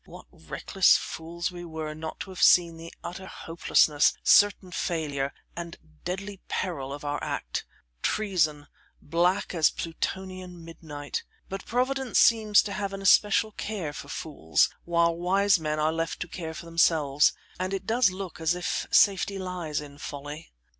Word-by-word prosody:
What - - -12
reckless 195 -2 +2
fools 170 +2 -5
we 175 -1 -8
were 160 -2 -5
not 155 +1 -7
to 190 - -6
have 185 - -7
seen 170 -2 +5
the 165 +1 -9
utter 190 +2 -7
hopelessness, 160 -4 +2
certain 205 -2 +5
failure, 145 -6 -2 0.2
and 170 -1 -6 0.3
deadly 195 +2 -5
peril 140 -7 -3
of 145 +1 -7
our 145 0 -2
act; - - -3 0.4
treason 160 -9 0 0.3
black 180 +6 +1
as 160 -3 +4
Plutonian 180 0 -5
midnight. 150 -3 -6 0.3
But 195 0 -6
Providence 255 +1 0
seems 215 -2 +5
to 200 - -5
have 200 -1 -3
an 195 0 -6
especial 210 +2 +4
care 200 -8 -4
for - - -8
fools, 80 - 0
while 170 -1 +2
wise 195 +2 +3
men 155 -1 -2
are 155 +1 +2
left 165 0 -2
to 175 - -3
care 165 -2 -6
for 170 - -8
themselves, 160 -4 +3 0.3
and 185 +1 -2
it 195 -1 -3
does 230 0 +3
look 185 -3 -7
as 160 +2 +2
if 180 - -2
safety 200 0 +4
lies 180 -5 -3
in 145 -1 -12
folly. 145 +2 -7
170 Hz, 155 wpm, -27 LUFS, 155-195 Hz, 0.4 s, seen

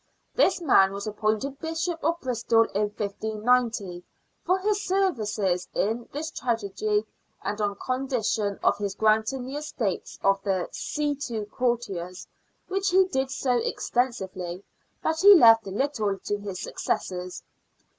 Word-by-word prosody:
This 380 -6 +3
man 195 - +4
was 200 0 -5
appointed 215 +6 -1
Bishop 325 +1 -3
of 335 +3 +1
Bristol 235 -2 +2
in 210 +2 +2
1590 215 -2 -1 0.4
for 370 - +2
his 410 +1 0
services 215 - 0
in 225 +3 -1
this 315 +3 -4
tragedy 215 - -1 0.4
and 210 +1 -3
on 205 -1 0
condition 245 -6 -1
of - - +3
his 200 -1 -2
granting 220 +4 +2
the 270 +3 -5
estates 250 -10 -3
of 195 0 +3
the 190 -3 -1
see 295 -1 -2
to 220 -3 -3
courtiers, 205 -6 -2 0.4
which 390 +1 0
he 375 +1 +5
did 265 -7 -1
so 255 -2 0
extensively 190 -8 -2 0.4
that 320 0 0
he 405 +1 +10
left 225 - +7
little 210 -2 -1
to 205 +1 -3
his 200 -3 -6
successors. 180 -1 -3
225 Hz, 135 wpm, -26 LUFS, 200-275 Hz, 0.4 s, he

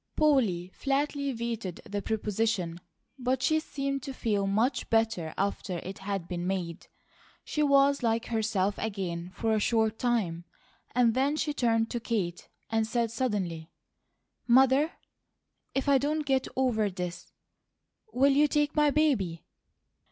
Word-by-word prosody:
Polly 225 - +2
flatly 280 0 -1
vetoed 230 -6 -4
the 205 0 -3
proposition, 210 -5 -1 0.4
but 255 +1 0
she 315 0 +3
seemed 275 -3 -3
to 275 -1 -6
feel 205 -5 0
much 225 +7 0
better 225 -8 +1
after 195 -2 -2
it 190 +3 -7
had 195 -3 -3
been 175 -1 -3
made. 180 -3 -3 0.6
She 300 - -2
was 280 -1 +4
like 230 -1 +1
herself 210 -3 0
again 180 -5 -3
for 225 +1 0
a 215 - +2
short 220 0 +1
time, 195 -9 0 0.5
and 240 -2 +4
then 275 +4 +1
she 305 -1 -1
turned 225 -4 +1
to 240 - -1
Kate 200 -7 -3 0.2
and 225 -1 +1
said 230 -1 0
suddenly: 195 -10 -2 0.8
"Mother, 265 +5 +5 0.8
if 270 +1 0
I 280 -1 +5
don't 300 +2 -1
get 265 -2 +1
over 235 -5 +1
this, 180 -2 -6 0.8
will 275 +2 +4
you 290 +2 +4
take 295 0 +1
my 300 -1 +4
baby?" 260 - +1
225 Hz, 140 wpm, -29 LUFS, 195-270 Hz, 0.8 s, Mother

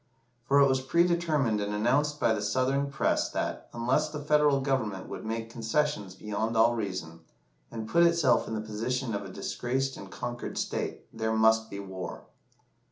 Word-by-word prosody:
For 140 +2 +4
it 140 - +7
was 130 -1 +1
predetermined 155 -7 +2
and 105 0 -2
announced 145 +7 +1
by 115 - +3
the 105 - -2
Southern 130 +6 +1
press 140 - +1
that, - - -3
unless 130 +6 +1
the 150 0 -5
Federal 150 -1 +3
Government 130 -8 -1
would - - -7
make 115 +1 -4
concessions 115 -4 -1
beyond 110 +3 -2
all 115 +1 +5
reason, 95 -7 -4 0.5
and 110 -1 -6
put 170 +8 +3
itself 170 -6 +4
in 110 - -3
the 110 - -2
position 115 +3 -2
of 100 - -2
a - - -8
disgraced 135 +2 -2
and 100 - -9
conquered 120 +3 -5
state, - - -3
there 110 0 -1
must 110 0 +4
be 100 - -6
war. 95 -2 -6
120 Hz, 170 wpm, -29 LUFS, 110-140 Hz, 0.5 s, it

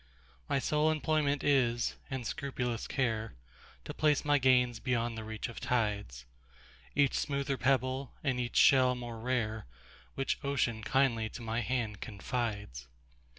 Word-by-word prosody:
My 140 - +2
sole 150 +3 +2
employment 155 -2 +1
is, 120 -5 +2
and 130 -3 -4
scrupulous 125 -3 -3
care, 115 -5 -1 0.5
To 150 - -5
place 150 -1 +2
my 145 -1 +4
gains 125 -3 +3
beyond 120 -2 -1
the 110 - -5
reach 110 +1 -5
of 115 - -8
tides,—Each 100 - -2
smoother 140 -1 -1
pebble, 130 0 0
and 130 -4 0
each 120 -1 -3
shell 130 -2 +6
more 120 -2 -6
rare, 110 - -2 0.5
Which 135 - -1
Ocean 125 -5 0
kindly 120 -3 +2
to 120 - -9
my 115 +1 -1
hand 115 -4 -2
confides. 105 - -4
125 Hz, 135 wpm, -32 LUFS, 110-135 Hz, 0.5 s, shell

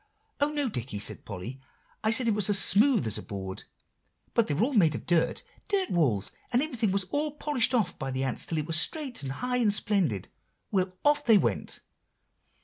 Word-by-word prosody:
"Oh, 285 +1 +1
no, 290 -2 0
Dicky!" 120 - -5
said 100 - -1
Polly, 110 +7 -7 0.4
"I 220 - +2
said 235 +2 +4
it 225 - +3
was 210 -1 +2
as 205 - +5
smooth 215 - +4
as 110 - +2
a - - -7
board, 95 -2 -7 0.7
but 230 - +2
they 145 - -1
were 180 - +1
all 275 +4 0
made 165 - +3
of - - -7
dirt, 170 -2 +1 0.2
dirt 395 -2 0
walls; 120 - +1 0.2
and 245 +3 +3
everything 240 -9 -1
was 195 0 +1
all 295 0 -1
polished 285 -4 0
off 200 -7 0
by 135 - -3
the 130 0 -2
ants 130 -2 -2
till 165 - -3
it 150 - -1
was 160 0 +2
straight, 285 - -3
and 135 -1 -4
high, 250 - -2
and 225 -4 +2
splendid. 190 - +1 0.4
Well, 185 -2 0
off 290 0 +3
they 225 -3 +6
went. - - -2
200 Hz, 210 wpm, -28 LUFS, -, 0.7 s, they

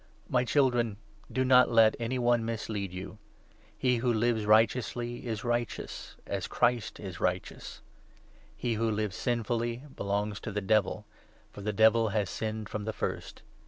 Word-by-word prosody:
My 125 -1 +2
Children, 120 -5 +2 0.3
do 130 0 +1
not 125 0 +6
let 115 -1 +5
any 120 +2 -1
one 120 -1 +2
mislead 110 -4 -3
you. 95 +3 -8 0.6
He 125 -1 +2
who 120 +1 +1
lives 110 -1 +1
righteously 120 +2 +2
is 110 -2 -3
righteous 120 -1 -3
— - - -32
as - - -3
Christ 120 -2 0
is 95 -3 -7
righteous. 90 0 -3 0.8
He 120 - -1
who 115 +1 0
lives 105 -2 -1
sinfully 120 +1 -1
belongs 105 +1 -2
to 110 - -6
the 105 - -1
Devil, 105 0 +1 0.5
for - - -10
the 105 +2 -1
Devil 110 +1 +4
has 100 -2 -1
sinned 110 -1 -3
from 105 -1 -5
the 110 - -2
first. - - -4
115 Hz, 160 wpm, -30 LUFS, 105-120 Hz, 0.8 s, not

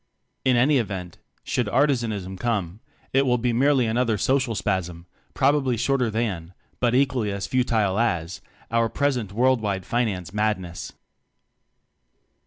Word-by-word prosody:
In 130 -2 +3
any 135 +3 +4
event, 95 -6 -5 0.2
should - - -1
Artizanism 115 -9 0
come, 105 -6 -2 0.3
it 135 +1 +4
will 125 -2 +2
be 120 0 0
merely 135 +1 +3
another 115 -1 +1
social 130 +2 +1
spasm, 90 -4 -2 0.3
probably 135 -4 +2
shorter 125 0 +1
than, 95 -6 -3 0.2
but 120 -1 +2
equally 130 -5 +1
as 100 -1 -3
futile 115 -6 +1
as, 85 -7 -1 0.3
our 115 0 +2
present 125 -8 -1
world 125 +3 +2
wide 100 -3 -2
finance 100 -7 -1
madness. 105 -5 -2
115 Hz, 130 wpm, -24 LUFS, 95-125 Hz, 0.3 s, any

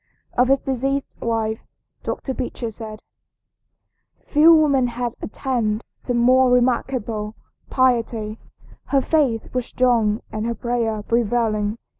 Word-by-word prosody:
Of 250 +1 +3
his 275 +1 +4
deceased 270 +1 -2
wife 225 -1 -1 0.4
Dr. 265 - -4
Beecher 240 -2 -4
said: 215 -1 -9 1.2
"Few 310 +2 +6
women 285 -6 +4
have 240 0 -3
attained 225 -2 -2 0.2
to 245 - -1
more 255 +2 +5
remarkable 240 -3 0 0.3
piety. 230 -4 +1 0.5
Her 275 -1 +2
faith 270 -8 0
was 250 -2 -2
strong 230 -4 +2
and 215 +1 -3
her 235 - -2
prayer 230 -3 -1
prevailing. 225 -2 0
240 Hz, 115 wpm, -22 LUFS, 220-255 Hz, 1.2 s, Few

